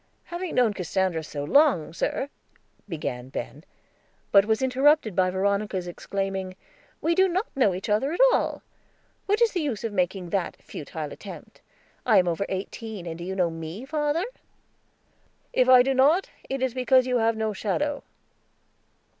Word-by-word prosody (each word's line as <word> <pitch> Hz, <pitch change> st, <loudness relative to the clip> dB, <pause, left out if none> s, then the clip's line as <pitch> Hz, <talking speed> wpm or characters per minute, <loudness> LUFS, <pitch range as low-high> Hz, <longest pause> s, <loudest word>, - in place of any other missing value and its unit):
"Having 350 Hz, 0 st, -5 dB
known 240 Hz, -4 st, +3 dB
Cassandra 185 Hz, -2 st, -1 dB
so 145 Hz, -2 st, -5 dB
long, 215 Hz, -, +3 dB
sir," 270 Hz, +10 st, -2 dB, 0.6 s
began 130 Hz, -7 st, -4 dB
Ben, 145 Hz, +2 st, -6 dB, 0.7 s
but 200 Hz, -1 st, +6 dB
was 220 Hz, +3 st, +1 dB
interrupted 265 Hz, -, +3 dB
by 185 Hz, -1 st, +3 dB
Veronica's 195 Hz, 0 st, -1 dB
exclaiming, 190 Hz, +1 st, -4 dB, 0.5 s
"We 330 Hz, -, +2 dB
do 380 Hz, +2 st, +4 dB
not 375 Hz, +4 st, 0 dB
know 215 Hz, -9 st, +3 dB
each 185 Hz, -, -5 dB
other 215 Hz, +7 st, +1 dB
at 345 Hz, -, -4 dB
all. -, -, -1 dB, 0.6 s
What 420 Hz, +4 st, +3 dB
is 460 Hz, -, +3 dB
the 360 Hz, -, -1 dB
use 260 Hz, -9 st, -3 dB
of 225 Hz, -2 st, -3 dB
making 180 Hz, -1 st, -1 dB
that 190 Hz, -3 st, -2 dB
futile 150 Hz, 0 st, -7 dB
attempt? 200 Hz, -, -11 dB, 0.4 s
I 220 Hz, -4 st, +4 dB
am 180 Hz, -1 st, +4 dB
over 175 Hz, +3 st, -1 dB
eighteen, 200 Hz, +1 st, -5 dB
and 165 Hz, -1 st, -5 dB
do -, -, -6 dB
you 190 Hz, +2 st, -4 dB
know 180 Hz, -3 st, +1 dB
me, 165 Hz, +8 st, -7 dB
father?" 300 Hz, +4 st, 0 dB, 1.3 s
"If 255 Hz, 0 st, +3 dB
I 255 Hz, -1 st, +8 dB
do 270 Hz, +1 st, +1 dB
not, 290 Hz, +8 st, +3 dB, 0.2 s
it 270 Hz, -1 st, -2 dB
is 260 Hz, -2 st, 0 dB
because 255 Hz, 0 st, +3 dB
you 250 Hz, -1 st, +1 dB
have 225 Hz, 0 st, +2 dB
no 220 Hz, -1 st, -1 dB
shadow." 280 Hz, +9 st, -1 dB
210 Hz, 165 wpm, -26 LUFS, 185-270 Hz, 1.3 s, I